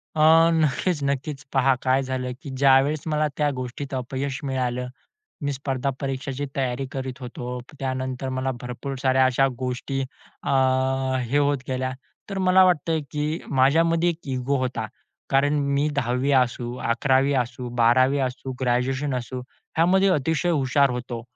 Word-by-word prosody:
अ, 155 Hz, -, +1 dB, 0.3 s
नक्कीच-नक्कीच. 145 Hz, -2 st, 0 dB
पहा 135 Hz, 0 st, +4 dB
काय 130 Hz, +1 st, +2 dB
झालं, 130 Hz, -1 st, -3 dB
की 140 Hz, -, -8 dB
ज्यावेळेस 135 Hz, +2 st, +3 dB
मला 155 Hz, -1 st, +1 dB
त्या 150 Hz, -1 st, +2 dB
गोष्टीत 130 Hz, +2 st, -6 dB
अपयश 135 Hz, +2 st, -3 dB
मिळालं, 125 Hz, -2 st, -2 dB, 0.6 s
मी 145 Hz, 0 st, 0 dB
स्पर्धा 135 Hz, -1 st, -2 dB
परीक्षेची 135 Hz, +1 st, -3 dB
तयारी 130 Hz, 0 st, -1 dB
करीत 130 Hz, 0 st, -5 dB
होतो. 125 Hz, 0 st, -6 dB, 0.2 s
त्यानंतर 130 Hz, 0 st, -3 dB
मला 130 Hz, 0 st, -1 dB
भरपूर 125 Hz, +3 st, -5 dB
साऱ्या 130 Hz, -1 st, +4 dB
अशा 130 Hz, +1 st, +3 dB
गोष्टी 130 Hz, +1 st, -3 dB, 0.4 s
अ, -, -, -4 dB, 0.7 s
हे 125 Hz, +4 st, 0 dB
होत 145 Hz, -1 st, +2 dB
गेल्या. 130 Hz, 0 st, -1 dB, 0.4 s
तर 195 Hz, -, -3 dB
मला 185 Hz, 0 st, +5 dB
वाटतंय, 165 Hz, -2 st, +2 dB
की 150 Hz, +1 st, -2 dB
माझ्यामध्ये 165 Hz, +6 st, +3 dB
एक 165 Hz, -, -5 dB
इगो 130 Hz, +2 st, 0 dB
होता 125 Hz, -3 st, -2 dB, 0.4 s
कारण 140 Hz, +2 st, +3 dB, 0.2 s
मी 145 Hz, +2 st, +2 dB
10वी 125 Hz, +1 st, 0 dB
असू, 125 Hz, -2 st, +1 dB
11वी 130 Hz, +4 st, +2 dB
असू, 125 Hz, +1 st, -4 dB
12वी 130 Hz, +4 st, +4 dB
असू, 130 Hz, 0 st, -3 dB
ग्रॅज्युएशन 130 Hz, +3 st, 0 dB
असू. 125 Hz, +1 st, -4 dB, 0.4 s
ह्यामध्ये 190 Hz, +4 st, +4 dB
अतिशय 160 Hz, +2 st, +1 dB
हुशार 140 Hz, -3 st, +3 dB
होतो 125 Hz, -1 st, -5 dB
135 Hz, 140 wpm, -24 LUFS, 130-145 Hz, 0.7 s, मला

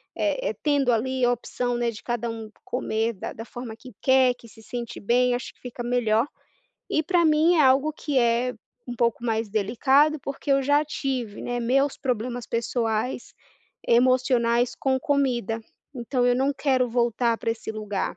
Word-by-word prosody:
eh -, -, 0 dB
eh -, -, -2 dB
tendo 285 Hz, -4 st, +2 dB
ali 255 Hz, +3 st, 0 dB
a 245 Hz, -, +3 dB
opção, 245 Hz, +1 st, -3 dB
né, 240 Hz, -1 st, 0 dB
de 210 Hz, -, -11 dB
cada 240 Hz, -1 st, -2 dB
um 225 Hz, -1 st, -6 dB
c -, -, -19 dB
comer 225 Hz, -2 st, -1 dB
da 190 Hz, -, -6 dB
da 225 Hz, -, -7 dB
forma 240 Hz, -2 st, -8 dB
que 250 Hz, +2 st, -13 dB
quer, 260 Hz, -1 st, +4 dB
que 235 Hz, -, -16 dB
se 225 Hz, 0 st, -16 dB
sente 240 Hz, -1 st, -6 dB
bem, 245 Hz, +3 st, +2 dB
acho 250 Hz, -, -6 dB
que -, -, -33 dB
fica 245 Hz, -1 st, -7 dB
melhor. 235 Hz, -2 st, +2 dB, 0.7 s
E 315 Hz, -, +2 dB
pra 345 Hz, +1 st, +2 dB
mim 315 Hz, +3 st, +4 dB
é 310 Hz, -, +5 dB
algo 275 Hz, +3 st, +4 dB
que 290 Hz, -4 st, -1 dB
é 240 Hz, +1 st, +2 dB, 0.4 s
um 245 Hz, -, -4 dB
pouco 235 Hz, 0 st, +1 dB
mais 225 Hz, -2 st, -1 dB
delicado 265 Hz, +9 st, +3 dB
porque 275 Hz, +2 st, -5 dB
eu 275 Hz, 0 st, +4 dB
já 290 Hz, +2 st, +3 dB
tive 265 Hz, -7 st, -4 dB
né, 245 Hz, 0 st, -2 dB
meus 270 Hz, +4 st, +1 dB
problemas 245 Hz, -1 st, -2 dB
pessoais, 230 Hz, +1 st, -2 dB, 0.5 s
emocionais 245 Hz, -1 st, +3 dB
com 265 Hz, -1 st, 0 dB
comida, 250 Hz, -6 st, 0 dB, 0.3 s
então 245 Hz, +1 st, -1 dB
eu 245 Hz, -, +4 dB
não 270 Hz, +3 st, +1 dB
quero 260 Hz, -3 st, +1 dB
voltar 235 Hz, 0 st, +1 dB
pra -, -, -1 dB
esse 225 Hz, -1 st, -4 dB
lugar, 210 Hz, -4 st, -3 dB
245 Hz, 180 wpm, -25 LUFS, 230-265 Hz, 0.7 s, é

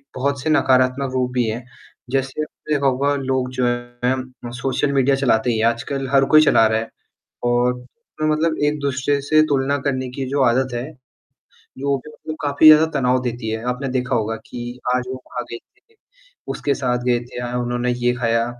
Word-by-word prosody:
बहुत 140 Hz, +1 st, -1 dB
से 155 Hz, -, -2 dB
नकारात्मक 130 Hz, -2 st, +2 dB
रूप 125 Hz, -1 st, 0 dB
भी 125 Hz, -1 st, +2 dB
हैं, 115 Hz, +3 st, -4 dB, 0.5 s
जैसे 135 Hz, +2 st, -1 dB
आपने 150 Hz, 0 st, -6 dB
देखा 140 Hz, -1 st, 0 dB
होगा 140 Hz, +2 st, +1 dB
लोग 130 Hz, -2 st, -1 dB
जो 125 Hz, 0 st, 0 dB
हैं 120 Hz, +1 st, -3 dB
सोशल 135 Hz, +2 st, 0 dB
मीडिया 135 Hz, 0 st, +3 dB
चलाते 125 Hz, -3 st, +2 dB
ही 115 Hz, -, 0 dB
हैं, 110 Hz, -, +2 dB
आजकल 135 Hz, +4 st, -2 dB
हर 135 Hz, -1 st, +5 dB
कोई 155 Hz, -, +9 dB
चला 115 Hz, -, +5 dB
रहा 110 Hz, 0 st, +1 dB
है 115 Hz, -, -6 dB, 0.5 s
और 120 Hz, +1 st, +2 dB, 0.5 s
मतलब 155 Hz, +1 st, +1 dB
एक-दूसरे 140 Hz, -1 st, 0 dB
से 155 Hz, +2 st, +4 dB
तुलना 140 Hz, 0 st, +1 dB
करने 130 Hz, -2 st, -1 dB
की 135 Hz, -, -2 dB
जो 140 Hz, 0 st, 0 dB
आदत 125 Hz, +1 st, +2 dB
है, 125 Hz, +6 st, -4 dB, 0.9 s
जो 140 Hz, +1 st, 0 dB
कि 150 Hz, -, -10 dB
मतलब 155 Hz, +1 st, -8 dB
काफ़ी 145 Hz, +2 st, +5 dB
ज़्यादा 155 Hz, +1 st, +9 dB
तनाव 125 Hz, 0 st, +2 dB
देती 120 Hz, -2 st, -3 dB
है, 110 Hz, 0 st, -3 dB
आपने 125 Hz, +2 st, -2 dB
देखा 125 Hz, 0 st, -1 dB
होगा 115 Hz, -1 st, -1 dB
कि 120 Hz, +1 st, -7 dB, 0.2 s
आज 125 Hz, -, 0 dB
वो 130 Hz, -, -3 dB
वहाँ 125 Hz, -1 st, -7 dB
गए 115 Hz, -, -4 dB, 0.3 s
थे, -, -, -29 dB, 0.5 s
उसके 140 Hz, -, -1 dB
साथ 125 Hz, -2 st, -1 dB
गए 120 Hz, -1 st, +2 dB
थे, 120 Hz, -, -8 dB
आज 120 Hz, 0 st, -4 dB
उन्होंने 120 Hz, 0 st, -1 dB
ये 125 Hz, -, +4 dB
खाया, 115 Hz, -1 st, +1 dB
130 Hz, 190 wpm, -21 LUFS, 120-140 Hz, 0.9 s, कोई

